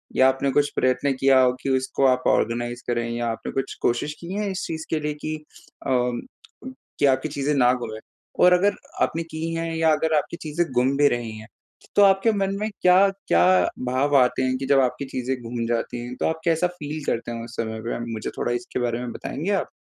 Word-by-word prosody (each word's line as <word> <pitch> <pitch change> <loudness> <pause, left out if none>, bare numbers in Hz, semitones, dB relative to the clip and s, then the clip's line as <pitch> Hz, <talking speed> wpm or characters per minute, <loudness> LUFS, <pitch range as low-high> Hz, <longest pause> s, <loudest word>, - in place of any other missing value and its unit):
या 130 - +6
आपने 135 +1 +1
कुछ 145 +2 +2
प्रयत्न 130 +2 +1
किया 135 -1 +5
हो 130 -1 +5
कि - - -2
उसको 130 +1 0
आप 125 -1 +2
ऑर्गेनाइज़ 120 +1 0
करें 120 -1 -1
या 120 0 -2
आपने 115 - -4
कुछ 135 0 -3
कोशिश 120 +5 0
की 170 +1 -8
हैं 205 0 -1
इस 190 -1 -3
चीज़ 160 -1 -5
के 160 - 0
लिए 150 0 -2
कि 155 - -2 0.5
अ, - - 0 1.1
कि - - +4
आपकी 135 +2 +2
चीज़ें 140 0 -1
ना 125 -3 +5
घूमें? 110 -3 -5 0.4
और 180 - +7
अगर 200 +3 +3 0.3
आपने 165 - +1
की 165 0 -5
हैं 165 0 -2
या 160 0 +3
अगर 160 +1 0
आपकी 170 - -2
चीज़ें 160 +1 -1
गुम 125 +2 +2
भी 145 0 +5
रही 120 -2 -2
हैं, 110 +1 -11 0.5
तो - - +6
आपके 195 +3 +4
मन 195 -1 0
में 215 +1 -1
क्या-क्या 185 - +4 0.4
भाव 130 +3 +1
आते 125 0 +3
हैं? 130 0 0
कि 135 - -4
जब 140 0 +5
आपकी 130 +1 0
चीज़ें 130 0 -3
घूम 115 0 -4
जाती 120 +1 -2
हैं, 125 +1 -7
तो - - -2
आप 160 0 -2
कैसा 170 +1 +2
फील 150 0 -5
करते 115 +1 -2
हो 115 0 -5
उस 120 0 -11
समय 110 -1 -3
पे? 115 +1 -4
मुझे 110 - -4
थोड़ा - - -1
इसके 120 +1 -3
बारे 120 -1 -1
में 125 -1 -5
बताएँगे 170 +8 -4
आप? 195 - 0
135 Hz, 220 wpm, -24 LUFS, 120-160 Hz, 1.1 s, और